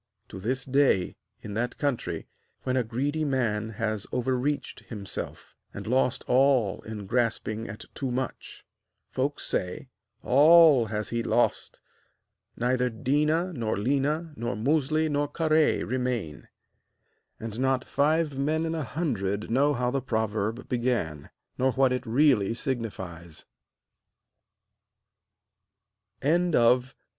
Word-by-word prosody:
To - - -8
this 125 +6 -2
day, 135 -9 +2 0.3
in 105 - -6
that 120 +3 -2
country, 140 -4 -2 0.4
when 130 -1 -1
a 130 - +2
greedy 140 +7 -2
man 115 -6 0
has 110 -1 -3
overreached 130 +3 -1
himself, 100 -4 -6 0.2
and - - -6
lost 125 +1 +1
all 130 -6 +3
in 110 -2 -7
grasping 115 -1 -1
at 105 - -8
too 135 - -3
much, 130 +1 -5 0.5
folks 140 +3 -2
say: 90 +8 -3 0.3
'All 150 -2 +6
has 105 0 -3
he 120 0 -1
lost! 120 +1 0 0.8
neither 125 +1 +1
Déna, 150 +9 0
nor 115 -6 -1
Léna, 145 - 0
nor 120 0 -3
Musli, 155 +6 +1
nor 145 -1 0
Kahré 155 -1 +2
remain.' 120 -10 -3 0.9
And 115 0 -6
not 130 0 +1
five 150 +1 +1
men 155 +4 0
in 165 - -2
a 160 -2 -2
hundred 110 - -2
know 140 +4 +3
how 125 0 0
the 135 +1 -1
proverb 110 -1 -2
began, 120 - -1 0.3
nor 130 0 +2
what 135 -1 +3
it 125 0 -3
really 115 -4 +3
signifies. 95 - -5
125 Hz, 115 wpm, -27 LUFS, 110-140 Hz, 0.9 s, All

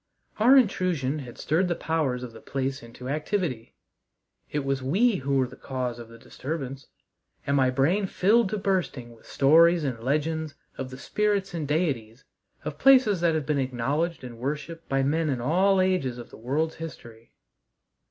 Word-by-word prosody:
Our 250 +6 +7
intrusion 180 - +1
had 125 -4 -9
stirred 170 +5 +1
the 175 - 0
powers 145 -8 -1
of 120 -2 -8
the 110 - -12
place 135 0 -3
into 115 +2 -10
activity. 150 - -2 0.7
It 145 -2 -2
was 135 -1 -1
we 195 - +2
who 140 +1 -1
were 130 - +3
the 125 - -11
cause 125 -3 -4
of 115 -1 -10
the 115 - -13
disturbance, 135 +1 -6 0.6
and 140 - +1
my 130 -2 +4
brain 160 +10 +1
filled 205 +4 +3
to 215 - -2
bursting 175 - -2
with 115 - -20
stories 165 +4 +5
and 130 -5 -2
legends 155 +4 -1 0.2
of 130 -1 -5
the 130 - -9
spirits 205 +4 -1
and 160 -4 -3
deities 135 -7 -1 0.4
of 150 0 -5
places 255 -9 +5
that 170 -2 +3
have 155 -3 -1
been 150 -1 0
acknowledged 135 +6 -1
and 120 -2 -9
worshiped 150 +5 -5
by 135 0 +1
men 155 +3 +1
in 130 -3 -1
all 185 +10 +3
ages 185 -10 +1
of 120 - -10
the - - -11
world's 150 +8 -1
history. 115 -8 -10
145 Hz, 175 wpm, -26 LUFS, 130-175 Hz, 0.7 s, Our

